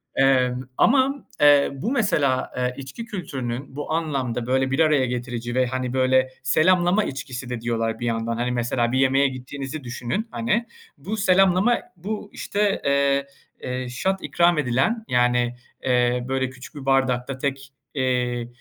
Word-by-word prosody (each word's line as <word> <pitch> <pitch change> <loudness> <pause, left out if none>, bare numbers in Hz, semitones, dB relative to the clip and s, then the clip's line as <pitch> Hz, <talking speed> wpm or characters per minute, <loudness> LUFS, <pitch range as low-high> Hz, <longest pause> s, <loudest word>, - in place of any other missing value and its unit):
Emm, 130 -2 +3 0.2
ama, 275 +2 +3 0.2
eee, 145 -1 +6
bu, 170 - -3
mesela, 150 - +1
eee, 125 0 0
içki 140 - -7
kültürünün 135 - -5
bu 145 +1 -5
anlamda 135 -8 -1
böyle 130 +1 +1
bir 135 - 0
araya 150 -5 +4
getirici 120 -1 -4
ve, 130 - +3
hani, 130 0 -3
böyle 130 0 +3
selamlama 175 +7 +3
içkisi 130 -4 -6
de 120 -2 -4
diyorlar 115 -1 -1
bir 120 - -3
yandan. 115 0 -1
Hani, 125 +1 -1
mesela, 120 0 0
bir 130 - +1
yemeğe 135 +1 +4
gittiğinizi 135 +3 -6
düşünün, 125 - -3
hani. 235 0 0 0.3
Bu 215 +2 -5
selamlama, 195 +3 +4 0.2
bu, 205 +3 -5
işte, 205 -1 -1
eee, 140 0 +2 0.4
eee, 125 0 -4
shot 190 +10 -1
ikram 175 -1 +3
edilen, 150 - +1
yani, 125 0 +2 0.3
eee, 125 -1 +2
böyle 130 -1 0
küçük 130 +4 -12
bir 140 -2 -8
bardakta 130 -1 +1
tek, 135 0 -4 0.2
eee, 125 -3 0
130 Hz, 150 wpm, -23 LUFS, 125-160 Hz, 0.4 s, eee